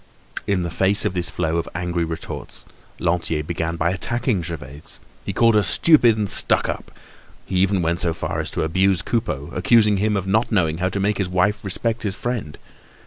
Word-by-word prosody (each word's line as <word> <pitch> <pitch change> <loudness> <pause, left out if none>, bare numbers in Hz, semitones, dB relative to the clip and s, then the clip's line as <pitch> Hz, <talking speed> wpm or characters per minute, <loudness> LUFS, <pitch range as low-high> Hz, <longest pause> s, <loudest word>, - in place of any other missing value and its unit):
In 100 -3 +1
the 85 - -3
face 95 +4 +2
of - - 0
this 90 -2 -2
flow 80 0 -1
of 85 - -2
angry 90 0 -1
retorts, 80 0 -6 0.3
Lantier 85 -3 0
began 85 +1 -3
by 85 +1 +1
attacking 115 +2 -1
Gervaise. 75 -4 -7 0.2
He - - -3
called 115 +4 +4
her 105 - +5
stupid 120 -2 +4
and 105 -1 0
stuck - - +2
up. - - -5 0.5
He 95 - -2
even 95 -1 +2
went 85 +1 0
so 85 - +1
far - - -3
as - - -2
to - - -2
abuse 95 +2 +2
Coupeau, 85 - -2
accusing 105 +2 +4
him 105 +1 +1
of 95 - -2
not 110 +6 +1
knowing 85 -6 +1
how 95 +1 +1
to 100 - -3
make 100 +1 0
his 95 -2 -1
wife 95 +4 +1
respect 115 +4 -1
his 100 -3 -2
friend. 115 -12 -4
95 Hz, 195 wpm, -22 LUFS, 85-105 Hz, 0.5 s, her